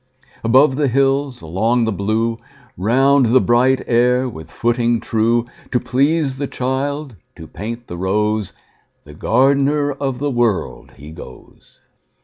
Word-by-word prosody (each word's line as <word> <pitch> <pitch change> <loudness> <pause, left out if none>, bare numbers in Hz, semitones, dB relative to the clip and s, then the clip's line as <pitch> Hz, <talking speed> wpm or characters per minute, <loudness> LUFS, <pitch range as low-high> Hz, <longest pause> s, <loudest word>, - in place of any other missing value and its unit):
Above 130 +4 +4
the 150 -2 +1
hills, 135 -1 0
along 110 +9 0
the 110 - -1
blue, 110 +4 -1 0.4
Round 130 +6 +3
the 125 +3 +5
bright 130 +2 +2
air 125 +2 +2
with 80 -9 -9
footing 120 +3 0
true, 115 +1 0 0.3
To 125 - +2
please 140 +1 0
the 140 - -2
child, 135 +1 -3 0.2
to 80 - -10
paint 115 +8 -7
the 85 - -8
rose, 105 +2 -1 0.5
The 75 - -14
gardener 140 - +2
of 135 -2 -3
the 145 +2 -2
World, 120 -6 -1
he 75 +3 -11
goes. 65 -5 -14
120 Hz, 135 wpm, -18 LUFS, 110-135 Hz, 0.5 s, the